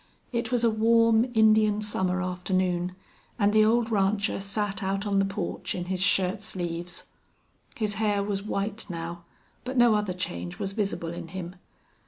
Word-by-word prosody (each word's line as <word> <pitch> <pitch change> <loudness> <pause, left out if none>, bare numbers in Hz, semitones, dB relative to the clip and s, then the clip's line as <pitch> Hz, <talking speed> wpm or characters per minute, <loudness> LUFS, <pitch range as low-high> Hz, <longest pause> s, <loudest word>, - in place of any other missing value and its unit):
It 235 -1 -2
was 245 -1 +2
a 230 - +4
warm, 230 +2 +4
Indian 215 -1 +5
summer 185 -3 0
afternoon, 180 0 -1 0.4
and 205 -2 +3
the 215 0 +6
old 230 +1 +2
rancher 200 0 +1
sat 200 +1 -2
out 195 +1 -1
on 200 -1 +2
the 195 - +3
porch 195 -2 -3
in 180 - -3
his 185 0 -2
shirt 190 +1 +2
sleeves. 175 -4 -5 0.7
His 215 -2 -1
hair 205 -2 +2
was 200 -1 -2
white 205 +1 -3
now, 170 0 -6 0.4
but 255 +1 -4
no 240 -2 +6
other 210 -3 0
change 90 - -4
was 195 0 -3
visible 195 -5 -2
in 170 -1 -7
him. 175 0 -6
200 Hz, 165 wpm, -27 LUFS, 180-215 Hz, 0.7 s, the